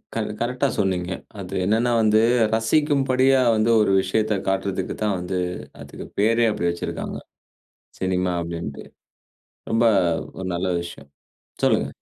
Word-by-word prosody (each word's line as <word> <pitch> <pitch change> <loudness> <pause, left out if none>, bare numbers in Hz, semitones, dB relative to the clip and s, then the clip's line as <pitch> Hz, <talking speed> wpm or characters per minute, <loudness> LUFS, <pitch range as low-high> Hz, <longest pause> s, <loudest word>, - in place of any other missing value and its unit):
க - - -2 0.2
கரெக்ட்டா 125 +2 0
சொன்னீங்க. 90 -2 0 0.3
அது 90 -2 -7
என்னன்னா 115 +4 +2
வந்து 110 0 +4 0.4
ரசிக்கும்படியா 135 +1 +2 0.2
வந்து 110 +1 +2
ஒரு 100 - +2
விஷயத்த 105 +2 0
காட்டுறதுக்கு 95 -1 -1
தான் 105 -2 +1
வந்து 90 +1 -3 0.4
அதுக்கு - - -9
பேரே 115 +3 +3
அப்படி 85 -4 -1
வச்சுருக்காங்க. 85 - -5 0.8
சினிமா 90 -1 0
அப்படின்ட்டு. 85 -4 -6 0.9
ரொம்ப 115 +1 +2 0.5
ஒரு 95 - -4
நல்ல 90 +2 -1
விஷயம். 70 -5 -11 0.5
சொல்லுங்க. - - +2
100 Hz, 120 wpm, -23 LUFS, 90-115 Hz, 0.9 s, வந்து